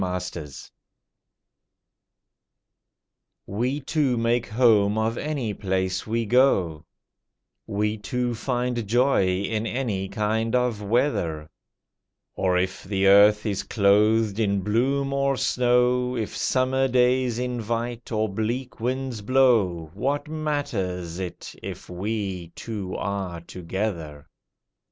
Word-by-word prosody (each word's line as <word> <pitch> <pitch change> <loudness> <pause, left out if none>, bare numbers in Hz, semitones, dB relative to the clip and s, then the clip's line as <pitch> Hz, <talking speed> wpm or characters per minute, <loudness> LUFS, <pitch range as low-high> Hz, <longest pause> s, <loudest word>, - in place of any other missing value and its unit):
WE 90 -1 -1
TWO 80 -4 -6 3.0
We 125 +8 -1
two 135 -3 0
make 115 +1 +1
home 110 -3 +3
of 110 +1 0
any 140 -8 -2
place 95 -1 -2
we 115 +1 0
go; 95 - +2 0.8
We 105 0 -1
two 120 +4 -2
find 120 -1 -2
joy 120 -2 +3
in 100 +4 -1
any 110 -7 -2
kind 110 +3 0
of 125 -4 +1
weather; 100 - 0 0.8
Or 90 -1 +1
if 90 +1 -2
the 95 0 -1
earth 105 +2 +6
is 100 -3 -1
clothed 105 +1 +3
in 100 -3 +1
bloom 135 +7 0
or 140 -1 +1
snow, 125 0 +2
If 110 -2 -3
summer 130 +1 +1
days 125 -1 +2
invite, 120 -1 -3
or 110 -1 +1
bleak 115 +5 -3
winds 125 -1 -2
blow, 105 -10 +2
What 140 +9 -1
matters 120 - -3
it 90 -2 -6
if - - -8
we 95 -2 -3
two 100 -5 -5
are 95 -3 -3
together? 85 -4 -5
110 Hz, 110 wpm, -25 LUFS, 95-125 Hz, 3.0 s, earth